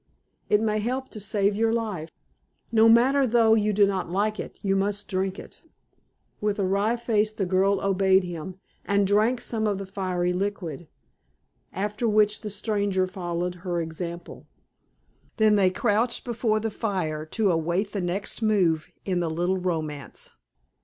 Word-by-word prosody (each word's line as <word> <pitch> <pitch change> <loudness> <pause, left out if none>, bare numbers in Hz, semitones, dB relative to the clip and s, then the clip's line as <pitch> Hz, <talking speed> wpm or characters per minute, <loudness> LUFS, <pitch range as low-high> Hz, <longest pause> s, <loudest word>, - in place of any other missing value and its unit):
It 210 - +4
may 215 -1 +1
help 255 +4 -2
to 215 - -8
save 200 0 0
your 225 +1 +2
life. 210 -9 -2 0.6
No 225 0 +5
matter 260 +4 +5
though 230 -1 +4
you 215 -1 +2
do 205 0 +4
not 190 -3 -2
like 210 +4 0
it, - - -7
you 195 -1 +1
must 200 +1 -1
drink 190 0 -2
it." - - -11 0.8
With 210 0 -1
a 200 - 0
wry 200 +5 +1
face 220 -2 +1
the 200 - -2
girl 190 +2 +2
obeyed 190 -1 +3
him, 175 0 -6 0.3
and 200 0 +2
drank 215 +5 +2
some 220 -3 -1
of 205 -2 0
the 195 - -5
fiery 185 -2 -1
liquid, 180 -5 -4 0.8
after 210 +5 -2
which 210 0 +3
the 215 - -5
stranger 205 -2 0
followed 180 -1 -3
her 175 -2 -2
example. 170 +1 -6 0.9
Then 215 -2 +4
they 195 -2 +4
crouched 225 +5 0
before 230 -2 0
the 220 0 -3
fire 180 -8 -2
to 205 +3 +1
await 170 +5 0
the 200 - -3
next 185 +5 -2
move 185 -8 +2 0.2
in 185 -2 0
the 170 -2 -1
little 175 +4 0
romance. 155 -6 -4
200 Hz, 160 wpm, -25 LUFS, 180-215 Hz, 0.9 s, No